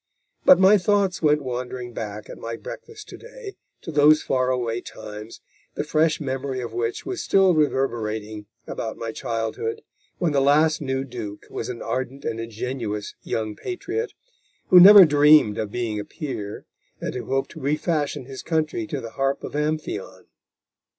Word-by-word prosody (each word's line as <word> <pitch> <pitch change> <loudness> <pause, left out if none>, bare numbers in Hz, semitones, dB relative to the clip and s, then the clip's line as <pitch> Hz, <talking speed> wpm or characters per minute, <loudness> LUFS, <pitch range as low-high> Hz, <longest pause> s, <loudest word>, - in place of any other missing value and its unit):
But 275 - +9
my 195 +2 +6
thoughts 195 -1 +1
went 150 -2 +3
wanderting 125 -1 -5
back 105 -1 -6
at - - -10
my 115 0 -5
breakfast 430 - -10
to - - -9
day 475 -4 -10 0.3
to 165 - -6
those 150 +1 +5
far 130 -1 +1
away 120 -2 -1
times, 105 0 -10 0.3
the - - -1
fresh 155 +1 +1
memory 135 -1 -3
of 120 -3 -6
which 115 0 -3
was 375 0 -4
still 190 -2 +4
reverberating 110 -8 -1 0.2
about 110 -1 -5
my 115 -1 -4
childhood, 115 -1 -3 0.3
when 170 -3 0
the 140 -1 +2
last 155 +3 +3
new 130 -1 -2
Duke 115 -6 -7
was - - -4
an 120 -2 -6
ardent 130 +2 -4
and 115 - -2
ingenuous 115 -2 -4
young 110 -2 -3
patriot, 390 +5 -4 0.6
who 180 - +9
never 195 +1 +11
dreamed 145 -7 +5
of 110 - -2
being 115 -3 -2
a - - -3
peer, 110 - -6 0.3
and - - -4
who 125 - -5
hoped 135 0 -1
to 160 - -10
refashion 150 -1 -1
his 135 0 -8
country 155 -9 -1
to - - -4
the 115 - -8
harp 135 +2 -1
of - - -6
Amphion. 155 +1 -3
135 Hz, 165 wpm, -23 LUFS, 115-155 Hz, 0.6 s, never